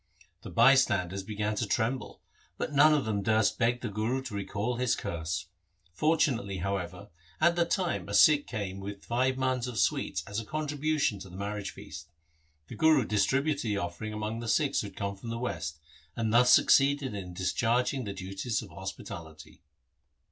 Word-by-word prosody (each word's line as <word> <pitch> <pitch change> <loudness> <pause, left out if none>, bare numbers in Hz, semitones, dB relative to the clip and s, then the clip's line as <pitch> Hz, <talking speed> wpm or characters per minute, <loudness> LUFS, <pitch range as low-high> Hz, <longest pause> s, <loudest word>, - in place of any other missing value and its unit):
The - - -8
bystanders 100 -9 +4
began 105 +1 -2
to 110 - -1
tremble, 120 +5 -2 0.4
but - - -3
none 145 +2 +6
of 145 - 0
them 105 -2 -1
durst 110 +1 +2
beg 120 0 +1
the - - -3
Guru 110 +6 -2
to 130 -5 -7
recall 105 +4 -2
his 125 0 +1
curse. 85 +1 -4 0.5
Fortunately, 130 - +1
however, 95 +1 -4 0.3
at 170 +2 +4
that 170 -1 +1
time 180 -2 -1
a - - -1
Sikh 150 -2 +6
came 100 -4 -4
with 100 0 -8
five 130 +2 +1
mans 130 -2 0
of 120 -3 -5
sweets 80 - 0
as 100 +2 -3
a - - -5
contribution 150 -4 -1
to 95 0 -10
the 90 - -10
marriage 100 0 -4
feast. - - -10 0.6
The - - -9
Guru 155 -6 +4
distributed 135 +9 +1
the 105 -3 -1
offer 85 +2 -4
ing 110 - -4
among 105 +1 -3
the 120 - -6
Sikhs - - +2
who - - -5
had - - -13
come 100 0 -3
from 105 +4 -9
the 115 - -3
West, 80 -10 -4 0.4
and 110 -1 -1
thus 125 +1 +6
succeeded 140 -2 +4
in 90 -3 -6
discharging 120 +8 0
the 100 - -4
duties 95 +5 -3
of - - -12
hos - - -5
pitality. 80 -2 -10
110 Hz, 185 wpm, -29 LUFS, 100-130 Hz, 0.6 s, none